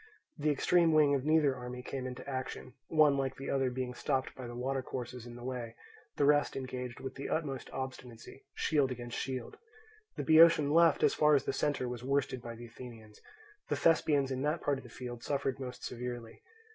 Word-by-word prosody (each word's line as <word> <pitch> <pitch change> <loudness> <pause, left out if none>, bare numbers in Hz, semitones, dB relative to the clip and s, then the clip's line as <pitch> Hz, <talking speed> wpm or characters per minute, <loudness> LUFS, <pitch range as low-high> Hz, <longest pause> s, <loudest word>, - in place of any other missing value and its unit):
The 150 -1 0
extreme 165 +3 +3
wing 150 -2 +5
of 135 -1 0
neither 155 -3 +4
army 125 0 -7
came 130 0 -4
into 125 +1 -8
action, 130 -2 -5
one 150 -3 +4
like 135 -1 -1
the 135 - -5
other 135 -1 +1
being 125 0 -3
stopped 130 +1 -1
by 130 -2 -8
the 120 - -7
water 135 +2 -1
courses 125 -1 -6
in 120 - -9
the 120 - -10
way; 120 -3 -5 0.4
the 145 - +2
rest 145 0 +3
engaged 125 -2 -5
with 130 0 -6
the 140 - -6
utmost 140 -5 -2
obstinacy, 130 -1 -7
shield 145 -4 +2
against 120 -1 -6
shield. 130 -3 -5 0.6
The - - -2
Boeotian 160 -2 +6
left, 165 -2 +5
as - - +5
far 150 -1 +4
as 140 - +1
the - - -1
centre, 145 -4 0
was 120 -1 -5
worsted 135 -1 0
by 115 -1 -7
the 120 +1 -9
Athenians. 115 -3 -12 0.5
The - - +1
Thespians 150 -4 +3
in 130 0 -2
that 150 +4 0
part 140 -2 +1
of - - -13
the - - -12
field 120 -2 -7
suffered 135 0 -1
most 125 -2 -7
severely. 120 -2 -6
130 Hz, 200 wpm, -32 LUFS, 125-145 Hz, 0.6 s, Boeotian